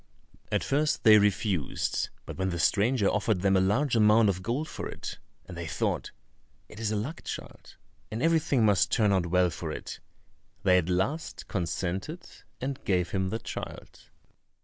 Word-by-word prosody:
At - - +1
first 150 +2 +1
they 110 -2 +8
refused, 100 - 0 0.2
but - - -7
when 95 0 -1
the 85 - -3
stranger 105 +6 +2
offered 105 -2 +1
them 95 0 +3
a - - +5
large 120 +8 +2
amount 110 0 +5
of 95 -1 -1
gold 125 +10 -2
for - - -6
it, - - -7 0.3
and 90 - -9
they 85 -1 -5
thought, - - -1 0.6
"It 105 - -12
is 110 -2 -1
a 110 - -1
luck 125 +11 -4
child, - - -8 0.3
and 110 +3 -4
everything 160 -7 +3
must 100 -4 +3
turn 105 -3 +3
out 90 -3 +1
well 90 0 +3
for - - -5
it," - - -7 0.6
they 90 -1 +5
at 90 0 -3
last 95 - -2
consented, 95 - -3 0.3
and 135 +1 -4
gave 90 -3 0
him 95 -1 0
the 110 - -2
child. - - -8
105 Hz, 170 wpm, -28 LUFS, 90-115 Hz, 0.6 s, they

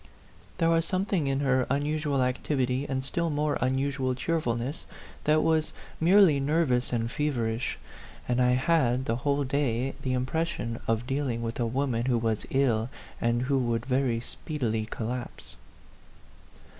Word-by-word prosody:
There 165 0 +3
was 165 0 +3
something 185 -3 0
in 135 0 0
her 130 -2 +2
unusual 145 0 0
activity 130 +1 0
and 130 -1 -2
still 170 +5 -1
more 150 0 0
unusual 130 0 0
cheerfulness 130 -3 -2 0.4
that 155 +1 +4
was 160 -1 +1 0.3
merely 175 -3 +6
nervous 135 -4 +1
and 115 -1 -1
feverish; 125 -6 -1 0.5
and 125 0 +1
I 125 0 +4
had, 130 -2 +2
the 115 -1 0
whole 140 +2 0
day, 135 -2 0
the 130 - -1
impression 130 -3 -2
of 115 +1 0
dealing 135 -3 -1
with 115 +1 -4
a 120 - +1
woman 125 -1 0
who 125 -2 +3
was 115 -2 -1
ill 120 -4 +1 0.3
and 120 +1 +1
who 135 +1 +1
would 120 -2 -1
very 130 -3 +1
speedily 115 -4 -3
collapse. 120 +3 -5
130 Hz, 145 wpm, -28 LUFS, 120-150 Hz, 0.5 s, merely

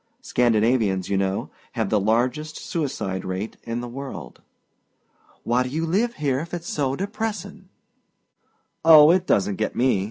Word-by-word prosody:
Scandinavians, 110 -5 +1
you 100 - +1
know, 95 0 -1 0.2
have - - -2
the 105 - +3
largest 125 +9 0
suicide 130 - -3
rate 95 +4 -4
in 115 +1 -4
the 120 - -6
world." 130 - -8 1.0
"Why 120 +2 +1
do 125 - -2
you 160 +5 -2
live 215 +8 0
here 140 -3 0
if 170 +3 -5
it's 170 0 -7
so 135 -3 -1
depressing?" 210 +1 -5 1.1
"Oh, 155 -1 +9
it 185 +1 +1
doesn't 100 0 +1
get 110 - -2
me. 125 -5 +2
130 Hz, 150 wpm, -23 LUFS, 110-160 Hz, 1.1 s, Oh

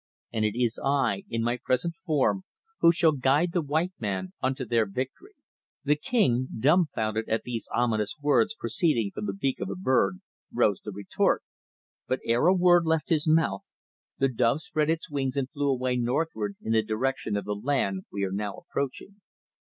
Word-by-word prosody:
And 110 -2 0
it 110 +2 0
is 120 -2 +1
I, 140 +7 +1
in 115 0 -1
my 120 +1 0
present 130 +7 0
form, 155 +5 +2 0.4
who 170 - +7
shall 165 -1 +3
guide 145 +5 +2
the 175 - +1
white 160 +5 -1
men 95 -4 -3
unto 130 0 -1
their 115 -2 +2
victory.' 135 - -6 0.5
The 145 +1 +3
king, 135 - +1
dumbfounded 115 - +1
at 110 - 0
these 120 -2 -4
ominous 110 -4 0
words 180 +10 +2
proceeding 135 - 0
from 105 - -4
the 100 - -2
beak 130 +6 -1
of - - -3
a - - -3
bird, 125 - +1 0.3
rose 100 -3 +2
to 105 - -6
retort, 100 0 0 0.6
but 130 - 0
ere 120 +7 +3
a 185 - +5
word 175 -2 +5
left 160 -1 +1
his 160 -2 +2
mouth 155 -11 +2 0.5
the 135 - +3
dove 125 +3 +1
spread 155 -1 -1
its 165 +2 -1
wings 140 -4 -2
and 135 -1 -1
flew 145 -2 -1
away 130 -1 0
northward 120 -4 -1
in 110 - -2
the 110 0 +4
direction 110 0 -1
of 100 - -4
the 105 - -2
land 100 -4 -1
we 100 - -3
are 95 - -1
now 100 0 -3
approaching." 170 +9 -5
130 Hz, 180 wpm, -27 LUFS, 110-155 Hz, 0.6 s, who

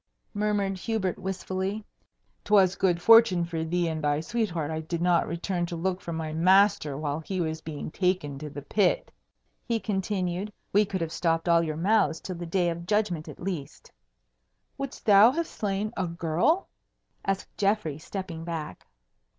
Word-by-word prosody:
murmured 205 -2 0
Hubert 205 -4 -2
wistfully. 190 +2 -3 0.6
"'Twas 195 -3 +4
good 180 -3 +1
fortune 225 -4 +6
for 165 -1 -3
thee 175 +1 0
and 160 -1 -3
thy 145 0 +2
sweetheart 165 -4 -2
I 160 - -2
did 165 +1 -4
not 175 0 +2
return 175 +1 -2
to 170 - -5
look 185 +2 -2
for 170 - -6
my 160 -1 -3
master 185 -3 +4
while 150 0 -2
he 185 +4 -4
was 160 -2 -2
being 155 -1 -6
taken 180 -7 -1
to 150 0 -6
the 145 0 -8
pit," 195 +4 +1 0.5
he 230 -1 -1
continued; 190 -2 -2 0.2
"we 210 +2 +5
could 190 -2 -3
have 165 -1 -2
stopped 165 0 0
all 170 -1 +5
your 155 -2 -3
mouths 195 -2 +2
till 185 - -6
the 175 0 -6
Day 175 0 +1
of 170 +1 -7
Judgment 200 -6 0
at - - -10
least." 175 -7 -6 0.8
"Wouldst 275 -1 -6
thou 205 +2 +8
have 335 +2 -1
slain 210 -3 -3
a 185 - -1
girl?" 170 - +1 0.6
asked 195 0 -3
Geoffrey, 200 -8 0
stepping 170 -1 -6
back. 165 - -6
180 Hz, 165 wpm, -27 LUFS, 165-200 Hz, 0.8 s, thou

